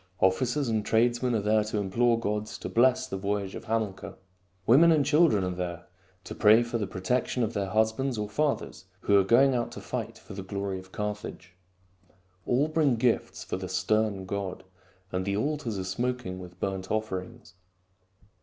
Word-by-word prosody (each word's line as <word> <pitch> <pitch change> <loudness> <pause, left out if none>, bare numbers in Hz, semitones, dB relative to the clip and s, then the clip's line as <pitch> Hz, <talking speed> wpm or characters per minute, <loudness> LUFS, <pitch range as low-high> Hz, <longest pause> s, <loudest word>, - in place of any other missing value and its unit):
Officers 125 +9 +2
and 110 -2 0
tradesmen 120 +2 +2
are 105 - 0
there 105 +1 +3
to 105 0 -3
implore 115 +4 +2
the 115 - -7
gods 105 +1 -2
to - - -6
bless 130 +2 +3
the 95 - -5
voyage 100 0 -2
of - - -8
Hamilcar. 110 -4 -2 0.5
Women 155 +10 +6
and 150 -3 +3
children 150 - +4
are 90 - -1
there 90 -1 -5 0.4
to - - -7
pray 110 +2 +5
for 115 0 -3
the 105 - -2
protection 125 +6 -1
of 115 +1 -2
their 100 -3 -1
husbands 110 +5 +1
or 105 0 -2
fathers 140 -3 -2 0.2
who 100 - +3
are - - +4
going 130 +7 +5
out 120 -1 -1
to - - -7
fight 115 -2 -5
for 110 - -12
the 95 - -6
glory 100 0 -4
of 95 0 -14
Carthage. 105 -3 -5 0.9
All 135 +5 +2
bring 155 -5 +2
gifts 115 +1 0
for - - -4
the 95 -1 -6
stern 95 +1 0
god, 95 -1 -4 0.5
and 90 0 -1
the 100 +1 -1
altars 140 -4 -2
are 95 - -3
smoking 115 0 -3
with 90 -1 -11
burnt 95 -1 -3
offerings. 110 -1 -4
110 Hz, 180 wpm, -28 LUFS, 95-120 Hz, 0.9 s, Women